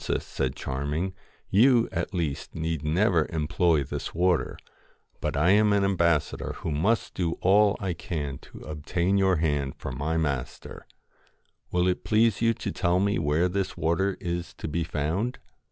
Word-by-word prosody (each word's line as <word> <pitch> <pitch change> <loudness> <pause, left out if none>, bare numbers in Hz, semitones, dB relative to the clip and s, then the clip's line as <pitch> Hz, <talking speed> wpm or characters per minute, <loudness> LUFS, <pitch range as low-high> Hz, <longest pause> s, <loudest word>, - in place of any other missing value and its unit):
1 - - -9
'Princess,' - - -1
said 65 -1 -2
Charming, 75 +8 -3 0.4
'you, 120 +3 +5
at - - -2
least, 80 -8 -3
need 80 -1 -2
never 85 +1 +2
employ 80 -1 +1
this - - -5
water; 90 0 +1 0.6
but - - -2
I 80 +6 +4
am 105 +1 +5
an 100 -1 +3
ambassador 85 -5 +1
who - - -5
must 100 +11 +1
do 85 -3 -1
all 100 +2 +3
I 95 -3 -2
can 75 -5 -4
to - - -14
obtain 85 +5 -1
your 95 -1 +3
hand 75 -4 0
for - - -6
my 70 +6 -2
master. 70 -6 -3 0.8
Will 90 0 +2
it 90 - 0
please 110 0 +2
you 115 -1 +3
to - - -4
tell 90 0 +1
me 100 +1 +1
where 80 +3 +2
this 95 +1 -2
water 90 +5 0
is 85 -1 -4
to - - -6
be 85 +2 -1
found 80 - -2
85 Hz, 170 wpm, -27 LUFS, 75-95 Hz, 0.8 s, you